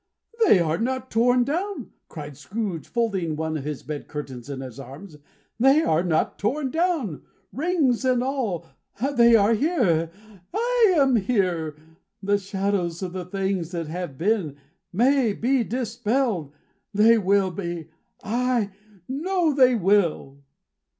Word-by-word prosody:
"They 210 - +7
are 165 0 0
not 260 +2 -2
torn 245 +2 +3
down," 330 - -3 0.2
cried 150 -2 -8
Scrooge, 195 - -4
folding 195 -9 -1
one 160 +1 -2
of 150 - -4
his 150 -2 -5
bed 150 +1 -6
curtains 135 -4 -7
in 135 -2 -5
his 130 -1 -9
arms, 145 +6 -10 0.4
"they 270 +6 +5
are 160 - +2
not 170 -3 0
torn 265 +6 -1
down, 320 - -1 0.3
rings 290 -5 +1
and 255 -1 +2
all. 235 - -2 0.5
They 235 -1 +6
are 215 +1 +4
here 215 - +1 0.4
I 465 0 +3
am 270 -4 +4
here 185 -8 0 0.5
the 200 +1 +2
shadows 190 -3 -2
of 180 -1 -4
the 185 -1 -5
things 190 -2 -2
that - - -3
would - - -9
have 170 -5 -5
been, 180 -5 0 0.4
may 245 +2 +3
be 250 +4 +1
dispelled. 230 - -1 0.4
They 225 +2 +6
will 195 -1 +2
be. 170 -3 -5 0.3
I 240 -1 0 0.4
know 330 +4 0
they 255 -2 +5
will!" 175 -9 +1
205 Hz, 140 wpm, -24 LUFS, 170-255 Hz, 0.5 s, They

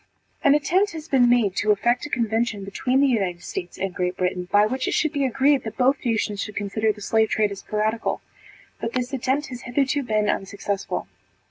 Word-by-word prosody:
An 285 0 +6
attempt 355 +7 +2
has 320 -1 -7
been 250 -5 +4
made 225 -6 +3
to 210 - 0
effect 240 +6 +2
a - - -13
convention 225 -4 -1
between 250 +7 0
the 280 - +5
United 190 -9 0
States 175 - -6
and 190 -1 -3
Great 180 0 -2
Britain, 180 -1 -2
by 205 +1 +5
which 255 +4 -2
it - - 0
should 310 - +1
be 280 -1 +1
agreed 270 +2 +2
that 220 -1 -7
both 265 +2 +2
nations 215 -4 -1
should 210 - -5
consider 215 +2 0
the 210 - -11
slave 220 +1 +2
trade 210 -1 +1
as 200 - -7
piratical; 215 +2 -1 0.6
but 230 - -4
this 250 +1 -2
attempt 270 +3 -1
has 250 -2 -7
hitherto 275 +3 0
been 215 -4 0
unsuccessful. 200 0 -2
225 Hz, 205 wpm, -24 LUFS, 205-265 Hz, 0.6 s, An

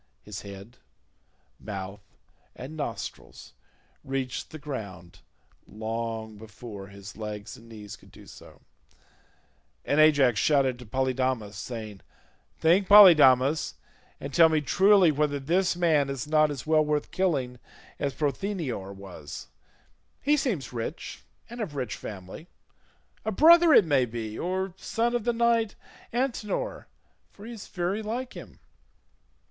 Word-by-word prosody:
His 105 -1 -7
head, 100 +4 -11 0.8
mouth, 100 -1 -7 0.5
and 135 +5 -8
nostrils 145 -7 -7 0.5
reached 135 -1 -4
the 155 - -8
ground 100 - -8 0.5
long 110 0 -5
before 110 -2 -10
his 100 +1 -11
legs 105 -1 -6
and 115 0 -16
knees 105 -3 -9
could - - -20
do - - -15
so, - - -15 1.2
and 145 - +1
Ajax 140 -7 +5
shouted 135 -4 +2
to 125 - -11
Polydamas 130 -3 -1
saying, 110 -3 -7 0.6
"Think, 180 +4 +3
Polydamas, 155 -8 +7 0.4
and 140 0 -7
tell 165 +1 +7
me 160 -1 +2
truly 190 +4 +4
whether 145 -1 0
this 175 +7 +1
man 160 -5 +2
is 135 -2 -4
not 155 0 +3
as 140 -3 -6
well 155 0 +4
worth 150 -1 -1
killing 135 -10 -1 0.4
as 140 -1 -2
Prothoenor 145 - -3
was: 85 -10 -10 0.7
he 295 +2 +2
seems 230 - -2
rich, 115 -2 -5 0.3
and 240 +1 -8
of 175 -9 -5
rich 125 -5 -3
family, 100 - -9 0.8
a 220 - -1
brother, 335 - +7
it 215 - +7
may 140 -5 +3
be, 110 -2 -6
or 185 +1 -2
son 235 +4 -1
of 235 -3 -2
the 240 - +3
knight 230 -2 +1 0.4
Antenor, 250 - -2 0.4
for 205 - -14
he 235 - -7
is 215 -4 -10
very 185 +3 -2
like 240 +4 -4
him." - - -11
140 Hz, 130 wpm, -27 LUFS, 110-185 Hz, 1.2 s, Polydamas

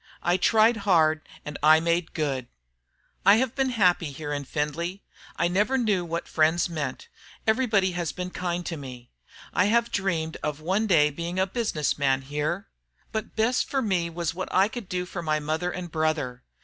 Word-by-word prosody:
I 175 0 +3
tried 220 +4 +4
hard 160 -6 +3 0.2
and 150 0 -6
I 155 +1 +7
made 170 0 0
good." 135 -5 -1 0.8
"I 200 +2 +7
have 250 +1 +1
been 270 -1 +1
very 255 - -3
happy 180 -6 +3
here 145 +1 -5
in 145 -1 -3
Findlay. 165 +7 -3 0.3
I 175 - +1
never 205 +9 +1
knew 210 -7 +1
what 170 0 -4
friends 160 +2 +2
meant. 150 -6 -4 0.4
Everybody 220 -5 +2
has 175 -3 -2
been 180 0 -5
kind 175 -1 -3
to 165 - -4
me. 125 -3 -10 0.4
I 185 - +3
have 235 +3 +2
dreamed 165 -5 -1
of 150 -1 -3
one 190 +7 0
day 150 -6 +4
being 170 +4 -5
a 190 - +3
business 190 - -1
man 135 -1 +2
here. 150 +8 -2 0.4
But 220 -2 -4
best 225 +3 +1
for 270 -2 0
me 180 -5 0
was 170 -1 -3
what 185 +2 -5
I 190 +2 +4
could 225 -5 -7
do 180 0 -2
for 180 0 -6
my 155 -2 0
mother 155 +4 -1
and 180 -1 -6
brother. 155 -6 -1
175 Hz, 190 wpm, -26 LUFS, 155-195 Hz, 0.8 s, I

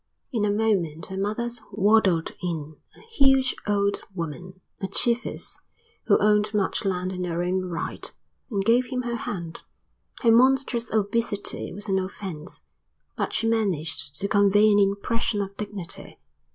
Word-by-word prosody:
In 215 -3 +1
a - - +1
moment 195 -7 +1
her - - -4
mother 210 +5 -1 0.2
waddled 200 -4 +3
in, 160 -4 -4 0.2
a - - -17
huge 270 - +3
old 200 -1 +1
woman, 175 +2 -6 0.2
a 195 - -1
chiefess, 235 +4 -1 0.5
who - - +6
owned 210 0 +3
much 200 -2 +1
land 185 -1 -1
in 180 0 -3
her 170 0 -1
own 185 +1 0
right; 175 -2 -4 0.4
and 200 -5 -1
gave 245 +3 +4
him 255 -1 -2
her 240 0 -2
hand. 170 -7 -5 0.6
Her 230 - +5
monstrous 250 -1 +3
obesity 215 0 0
was 205 +2 -6
an 190 -1 +2
offence, 185 -3 -6 0.5
but - - -2
she 225 - 0
managed 160 -10 0
to 200 - 0
convey 205 +1 +5
an 205 - +5
impression 205 +2 +1
of 200 0 -3
dignity. 205 -5 -6
205 Hz, 150 wpm, -25 LUFS, 185-225 Hz, 0.6 s, who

